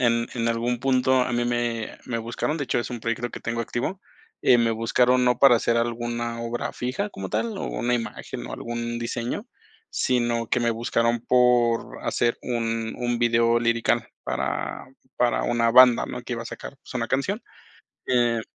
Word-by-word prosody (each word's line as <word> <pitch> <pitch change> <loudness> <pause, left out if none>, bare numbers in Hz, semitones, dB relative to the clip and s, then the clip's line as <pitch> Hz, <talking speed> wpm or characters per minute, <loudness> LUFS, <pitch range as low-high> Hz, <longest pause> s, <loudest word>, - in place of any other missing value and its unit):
en 115 -1 +2
en 115 -1 0
algún 120 +1 0
punto 130 -1 +3
a 125 - 0
mí 120 0 +1
me 120 -2 -2
me 115 -2 -2
buscaron, 120 +7 -2
de 145 - -2
hecho 125 - 0
es 120 - -3
un 120 - -5
proyecto 115 +1 -2
que - - -8
tengo 115 +1 -2
activo, 130 +11 -3 0.4
eh, 125 - +6
me 115 -1 +3
buscaron 125 +3 +2
no 125 -1 +3
para 130 -4 +7
hacer 115 +1 +1
alguna 120 0 -2
obra 115 +1 -3
fija 135 +12 -3
como 95 -1 -6
tal, 225 -3 -2
o - - -3
una 125 0 -1
imagen 115 - -5
o - - -7
algún 120 0 -4
diseño, 120 - -3 0.4
sino 120 -2 0
que 125 - +1
me 120 0 +2
buscaron 115 0 0
por 120 - +2
hacer 120 0 0
un 115 -2 -2
un 120 -1 -1
video 115 0 +3
lirical 115 0 +1 0.2
para - - -3 0.3
para 125 -1 +2
una 115 -1 +2
banda, 125 0 +7
¿no? 125 - -6
Que 125 - -6
iba 115 - -4
a 115 - -8
sacar, 135 - -8
pues - - -12
una 115 -2 -1
canción, 185 - -1 0.6
eh 120 -2 +2
120 Hz, 185 wpm, -25 LUFS, 115-125 Hz, 0.6 s, para